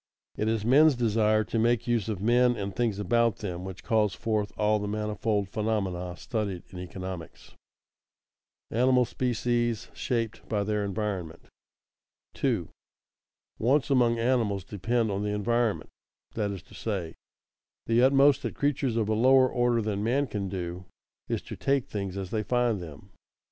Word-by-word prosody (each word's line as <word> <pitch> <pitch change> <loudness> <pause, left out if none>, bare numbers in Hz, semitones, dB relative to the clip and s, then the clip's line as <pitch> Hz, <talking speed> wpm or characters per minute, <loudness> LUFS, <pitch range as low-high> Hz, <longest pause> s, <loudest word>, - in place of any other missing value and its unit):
It 105 - -1
is 110 -1 0
men's 145 +4 +6
desire 110 -2 +2
to 115 - -2
make 120 +1 +2
use 120 -4 0
of 100 -3 -3
men 120 +2 +4
and 100 -1 -4
things 115 -4 0
about 115 +2 +2
them 90 -4 -5
which 95 -1 -8
calls 110 -4 +1
forth 105 -3 -1
all 105 0 +2
the 105 - -3
manifold 105 -1 -1
phenomena 95 -5 -2
studied 100 -5 -3
in 90 - -8
economics. 90 -1 -7 1.2
[Sidenote: 115 - 0
Animal 125 -1 +4
species 120 -1 -1
shaped 115 -3 -3
by 105 -2 0
their 105 0 -1
environment] 100 -5 -4 0.8
2. 115 - -1 0.9
_Wants 140 +5 +2
among 120 -3 +3
animals 115 -5 +1
depend 110 +4 -1
on 100 0 -2
the 105 - -1
environment; 115 +2 0 0.4
that 105 -2 -1
is 100 -4 -6
to - - -19
say, 95 -7 -3 0.7
the 115 +1 +3
utmost 135 +1 +5
that - - -4
creatures 140 -4 0
of 110 -2 +1
a 110 - +1
lower 130 +4 +5
order 120 -2 +1
than 105 -1 -2
man 130 +6 +2
can 100 -6 -4
do 90 -1 -5 0.4
is - - -2
to - - -7
take 135 -2 +1
things 100 -2 -4
as 95 -2 -5
they 110 - 0
find 120 -3 +1
them. 85 +4 -11
110 Hz, 160 wpm, -28 LUFS, 100-120 Hz, 1.2 s, men's